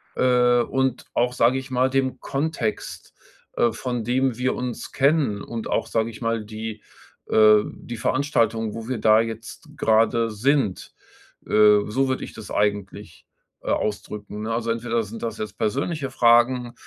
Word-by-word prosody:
äh, 125 -1 +3
und 130 0 -1
auch, 125 +1 +1
sage 125 +3 +3
ich 130 0 -7
mal, 130 +1 +2
dem 135 -1 -1
Kontext, 135 -6 -4 0.4
äh, 120 - +2
von 120 -2 -4
dem 125 0 0
wir 130 +1 0
uns 125 -2 -5
kennen 135 -7 +1
und 115 +1 -6
auch, - - 0
sage 115 0 -1
ich 110 - -13
mal, 115 -2 -1
die, 110 0 -7 0.5
äh 110 -1 +6
die 120 - -8
Veranstaltung, 115 -4 0
wo 115 0 -7
wir 130 -4 -3
da 110 0 +5
jetzt 115 -2 -6
grade 115 +1 +2
sind. 115 -1 0 0.5
Äh, 105 -1 +5
so 135 +5 0
würde 130 - -2
ich - - -8
das 110 - -10
eigentlich, 100 -3 -2 0.4
äh, - - -2
ausdrücken, 105 0 -3
ne? 115 - -2
Also, 115 0 -2
entweder 115 0 -1
sind 110 +2 -8
das 115 - -4
jetzt 110 - -6
persönliche 135 +5 -2
Fragen, 120 0 +3
115 Hz, 160 wpm, -23 LUFS, 110-130 Hz, 0.5 s, äh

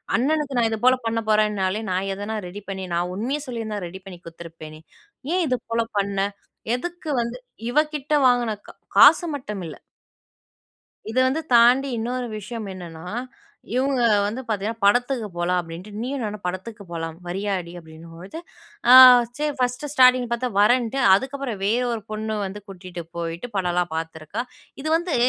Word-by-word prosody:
"அண்ணனுக்கு 285 +2 0
நான் 235 -1 +3
இது 220 - -2
போல 255 0 +6
பண்ண 225 0 0
போறன்னாலே 210 -2 +1
நான் 185 +2 -1
எதனா 205 +3 -4
ரெடி 195 +4 -8
பண்ணி, 190 -1 -4
நான் 175 +1 0
உண்மைய 250 +9 -2
சொல்லியிருந்தா 225 -4 -4
ரெடி 185 +2 -9
பண்ணி 190 -2 -9
கொடுத்துருப்பேனே? 165 -2 -10 0.5
ஏன் 365 0 +2
இது 255 -2 +1
போல 230 0 +2
பண்ண? 200 0 -1 0.6
எதுக்கு 350 +4 -6
வந்து" 235 +1 -4 0.3
இவ 295 - +4 0.2
கிட்ட 295 +1 -3
வாங்குன 240 -3 +2
க - - -8 0.3
காசு 295 +5 +8
மட்டும் 210 -8 -6
இல்ல 155 - -8 1.3
இத 225 - -5
வந்து 285 +5 0
தாண்டி 245 +4 +5
இன்னொரு 245 +2 -2
விஷயம் 215 +1 -6
என்னன்னா. 170 -3 -9 0.7
இவங்க 265 0 +1 0.2
வந்து 220 +5 -3
பார்த்தீங்கன்னா, 220 +1 -3
படத்துக்கு 245 +2 +2
போலாம் 180 +1 +1
அப்படின்ட்டு. 170 +4 -9
"நீயும் 260 +1 -3
நானும் 210 -2 -5
படத்துக்கு 200 +4 -5
போலாம், 165 -1 -5
வரியாடி?" 185 -1 -3
அப்படின்னும்பொழுது, 165 - -11 0.5
அ - - +10 0.4
சரி 300 0 -1
ஃபர்ஸ்ட்டு 250 +3 -1
ஸ்டார்ட்டிங் 255 -2 +5
பார்த்தா 240 +1 -1
வரேன்ன்ட்டு, 245 +4 +3 0.2
அதுக்கப்புறம் 265 -1 -3
வேற 225 +5 +2
ஒரு 225 - -4
பொண்ணு 215 0 -3
வந்து 195 +2 -7
கூட்டிட்டு 180 -2 -8
போயிட்டு 170 +7 -4
படம்லாம் 175 -2 0
பார்த்துருக்கா. 160 +6 -4 0.4
இது 305 - -4
வந்து, 345 -1 -2
215 Hz, 150 wpm, -23 LUFS, 185-250 Hz, 1.3 s, அ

